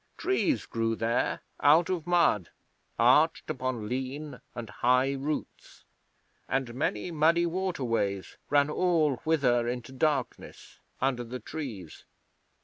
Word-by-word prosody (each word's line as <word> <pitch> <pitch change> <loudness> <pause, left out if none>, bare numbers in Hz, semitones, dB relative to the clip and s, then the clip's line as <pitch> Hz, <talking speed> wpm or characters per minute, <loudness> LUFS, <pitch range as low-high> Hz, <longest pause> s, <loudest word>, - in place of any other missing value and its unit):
Trees 350 -4 0
grew 115 0 -1
there 115 +2 0 0.2
out 160 +4 +5
of 175 -3 -3
mud, 170 - +3 0.5
arched - - +4
upon 125 -4 -3
lean 130 +3 -4
and 120 -2 -5
high 125 +2 +2
roots, 140 +3 -5 0.6
and 130 -3 -1
many 120 +3 -2
muddy 165 +2 +3
waterways 130 - -2
ran 145 0 +4
all 160 -6 +2
whither 125 -7 +1
into 125 +1 -4
darkness, 135 -1 -2 0.2
under 130 -2 0
the 125 +2 -6
trees. 115 - -7
135 Hz, 115 wpm, -28 LUFS, 120-160 Hz, 0.6 s, out